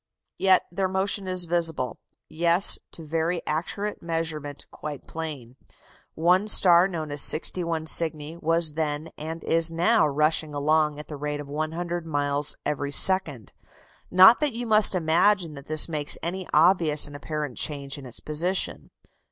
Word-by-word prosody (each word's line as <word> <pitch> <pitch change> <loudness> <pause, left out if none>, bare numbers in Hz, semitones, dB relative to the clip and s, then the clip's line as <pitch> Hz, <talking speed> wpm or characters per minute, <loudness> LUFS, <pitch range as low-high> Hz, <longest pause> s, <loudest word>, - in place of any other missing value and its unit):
Yet 190 -1 +3
their 190 +2 -2
motion 190 +1 -2
is 185 -1 0
visible 165 -8 -1 0.3
yes, 170 +4 +3
to 165 - -10
very 165 +2 -3
accurate 200 +7 -4
measurement 160 -4 -5
quite 150 -2 -9
plain. 145 -7 -8 0.6
One 180 +5 +1
star, 180 -3 +6
known 160 -5 -6
as 145 -1 +2
61 165 0 +2
Cygni, 160 -1 +1
was 165 -2 0
then 155 0 -4
and 160 +2 -8
is 165 0 +2
now 175 +5 +2
rushing 150 +1 -1
along 150 +1 0
at 150 - -10
the 150 - -9
rate 150 +1 -5
of 145 - -9
100 165 +3 -5
miles 145 -1 -1
every 145 -1 -3
second. 150 - +2 0.6
Not 190 +6 +6
that 295 -4 +2
you 240 +1 -6
must 215 -3 +4
imagine 170 +1 +1
that 140 0 -12
this 155 0 +3
makes 150 -3 -3
any 180 +2 -4
obvious 160 -2 +3
and 145 -1 -7
apparent 150 -2 -6
change 140 -1 -2
in 135 - -11
its 120 - -2
position. 175 +5 -3
160 Hz, 150 wpm, -24 LUFS, 150-175 Hz, 0.6 s, star